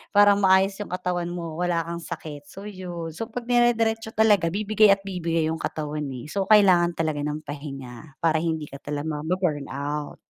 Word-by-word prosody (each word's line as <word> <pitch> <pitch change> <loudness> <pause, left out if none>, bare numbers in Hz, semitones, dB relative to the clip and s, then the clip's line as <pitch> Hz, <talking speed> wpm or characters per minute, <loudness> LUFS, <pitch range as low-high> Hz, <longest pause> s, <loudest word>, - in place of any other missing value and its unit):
Parang 205 0 +6
maayos 190 +1 +4
'yong 210 - -6
katawan 180 -1 -2
mo 170 -2 -5
wala 175 -2 +1
kang 170 0 -5
sakit. 155 -4 -7
So 195 - -11
'yon, 175 -5 -6
so 225 +6 -4
'pag 245 +1 -5
dire-diretso 230 -2 +2
talaga 205 -6 +4
bibigay 215 +2 +3
at 195 - -3
bibigay 165 -4 -1
'yong 160 0 -3
katawan, 150 -1 -3
eh. 125 +1 -7
So 200 - 0
kailangan 180 -5 +5
talaga 155 -3 0
ng 150 +1 -3
pahinga 135 -2 -8
para 160 -1 +3
hindi 160 -3 -2
ka - - -10
talaga 150 +1 -3
ma-burnout. 150 -4 -2
170 Hz, 175 wpm, -25 LUFS, 150-195 Hz, -, Parang